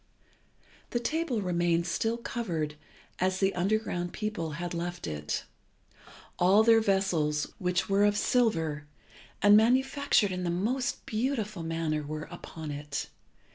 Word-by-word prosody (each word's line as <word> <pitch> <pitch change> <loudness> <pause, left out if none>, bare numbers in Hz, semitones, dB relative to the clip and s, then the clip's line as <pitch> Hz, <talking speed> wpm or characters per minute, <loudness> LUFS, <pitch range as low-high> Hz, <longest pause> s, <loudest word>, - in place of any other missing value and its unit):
The 240 - -1
table 265 -3 -1
remained 170 -1 +1
still 225 +5 0
covered 175 -11 -3 0.5
as 185 +1 +1
the 195 0 +2
underground 180 -2 -1
people 210 -8 -3
had 175 +3 -4
left 175 +1 -4
it. 75 -1 -3 1.0
All 190 +5 +6
their 225 0 +6
vessels, 180 -7 +1
which 180 0 0
were 195 +1 +3
of 205 0 +2
silver, 165 -12 +1 0.6
and 205 0 +8
manufactured 255 -1 +3
in 180 0 -3
the 175 - -1
most 225 +9 -1
beautiful 215 -5 -2
manner, 165 -2 -1
were 150 +1 -5
upon 160 -2 -7
it. 145 0 -5
185 Hz, 130 wpm, -29 LUFS, 165-220 Hz, 1.0 s, and